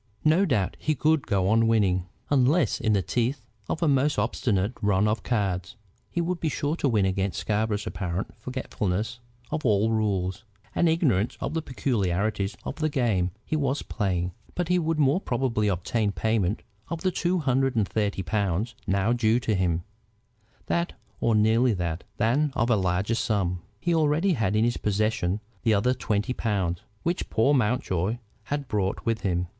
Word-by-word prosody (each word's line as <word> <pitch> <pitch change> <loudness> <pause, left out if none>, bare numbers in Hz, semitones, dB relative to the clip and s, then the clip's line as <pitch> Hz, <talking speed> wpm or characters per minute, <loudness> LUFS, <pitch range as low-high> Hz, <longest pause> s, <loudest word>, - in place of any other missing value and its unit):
No 165 +6 +5
doubt 105 - 0
he 155 - 0
could 150 +2 +2
go 95 -4 +1
on 115 +2 +4
winning. 95 -5 +2 0.2
Unless 145 +4 +3
in 110 -2 +2
the 100 -2 +2
teeth 125 +4 -1 0.3
of 165 - -1
a - - +3
most 145 +1 +2
obstinate 105 -2 0
run 105 -1 +3
of 110 +1 0
cards, 100 -3 -1 0.3
he 170 - -1
would 175 +1 -1
be 160 - 0
sure 145 +2 -1
to 140 - +1
win 105 -5 +3
against 95 0 -1
Scarborough's 105 0 -1
apparent 90 0 -3
forgetfulness 120 -3 -3 0.3
of 155 - -2
all 110 -1 +3
rules, 100 -4 0 0.3
and 170 - +3
ignorance 130 - +1
of - - -3
the 160 - 0
peculiarities 100 - -1
of - - -4
the 155 -1 0
game 110 -10 +1 0.2
he - - -1
was 140 -1 0
playing. 90 -4 -1 0.2
But 175 -1 -1
he 180 0 +3
would 165 -1 0
more 150 +5 +3
probably 120 - 0
obtain 100 +3 0
payment 110 -2 0 0.3
of 165 -1 -4
the 185 - +1
two 175 +1 0
hundred 135 -4 +1
and 105 -4 +2
thirty 100 -2 -1
pounds 100 +2 -1
now 100 +4 +2
due 115 -1 +3
to 110 - 0
him, 90 -3 +1 0.8
that 170 +1 0 0.3
or 115 - +2
nearly 110 +3 +4
that, 85 -3 -3
than 135 +7 +2
of 115 0 +1
a - - +5
larger 95 +2 0
sum. 95 -6 0 0.2
He 175 - 0
already 160 +4 +3
had 110 - 0
in 110 - +3
his 120 0 +1
possession 105 -2 0 0.2
the 110 -2 +3
other 125 +6 +2
twenty 105 0 -1
pounds 95 -8 -1 0.2
which 175 +2 -1
poor 115 +6 +3
Mountjoy 110 - +1 0.3
had 145 -1 -3
brought 100 -4 -1
with 115 -1 0
him. 90 -2 0
110 Hz, 175 wpm, -26 LUFS, 100-135 Hz, 0.8 s, No